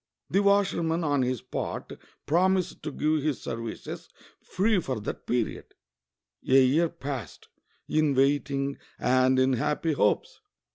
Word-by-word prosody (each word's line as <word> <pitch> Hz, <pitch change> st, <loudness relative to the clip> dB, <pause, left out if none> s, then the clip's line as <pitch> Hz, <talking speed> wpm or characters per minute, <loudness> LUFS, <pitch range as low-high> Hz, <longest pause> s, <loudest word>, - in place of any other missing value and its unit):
The 195 Hz, -, +3 dB
washerman 185 Hz, -5 st, +2 dB
on 145 Hz, -3 st, +1 dB
his 125 Hz, -2 st, -1 dB
part -, -, -5 dB, 0.3 s
prom 185 Hz, +5 st, +3 dB
ised 185 Hz, -1 st, -3 dB
to 150 Hz, -, -4 dB
give 155 Hz, +2 st, 0 dB
his 145 Hz, -2 st, -1 dB
sersices 115 Hz, -1 st, -6 dB, 0.3 s
free 200 Hz, +2 st, +1 dB
for 130 Hz, -7 st, -3 dB
that 105 Hz, -, -6 dB
period. 120 Hz, -2 st, -2 dB, 0.7 s
A 130 Hz, 0 st, +6 dB
year 160 Hz, +6 st, +3 dB
passed 135 Hz, -, -7 dB, 0.4 s
in 155 Hz, -2 st, +2 dB
waiting 140 Hz, 0 st, +1 dB, 0.2 s
and 130 Hz, +1 st, +3 dB
in 130 Hz, 0 st, +3 dB
happy 150 Hz, +5 st, 0 dB
hopes. 105 Hz, -7 st, 0 dB
145 Hz, 135 wpm, -27 LUFS, 130-165 Hz, 0.7 s, A